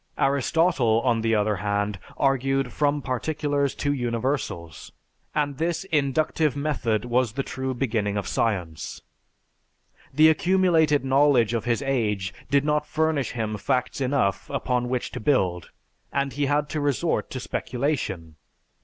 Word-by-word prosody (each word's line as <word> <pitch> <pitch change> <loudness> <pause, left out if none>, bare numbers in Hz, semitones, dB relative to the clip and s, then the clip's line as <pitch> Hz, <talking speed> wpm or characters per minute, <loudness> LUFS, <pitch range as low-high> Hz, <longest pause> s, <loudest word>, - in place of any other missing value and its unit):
Aristotle, 135 -3 +2
on 120 -3 +1
the 115 0 +2
other 105 -1 +1
hand, 100 0 -1 0.2
argued 135 -1 +1
from 145 -1 +1
particulars 145 +1 -1
to 145 0 0
universals, 120 - -3 0.4
and 145 -2 -1
this 170 +2 -1
inductive 150 0 +1
method 130 -7 -1
was 120 -2 +1
the 135 - -2
true 130 0 -4
beginning 110 -5 -1
of 100 - -3
science. 90 -8 -2 1.1
The 155 +3 +6
accumulated 160 -4 +3
knowledge 135 -4 +4
of 115 -1 -1
his 120 +3 0
age 105 -8 -1 0.2
did 140 0 +3
not 150 0 +1
furnish 155 -3 0
him 110 -3 -3
facts 125 +4 -1
enough 125 -8 0
upon 125 -1 -1
which 125 -1 -2
to - - -5
build 95 - +1 0.4
and 140 -1 -1
he 145 0 0
had 145 +1 +1
to 155 - -2
resort 145 +4 0
to 130 - -5
speculation. 120 - -3
130 Hz, 135 wpm, -25 LUFS, 115-145 Hz, 1.1 s, The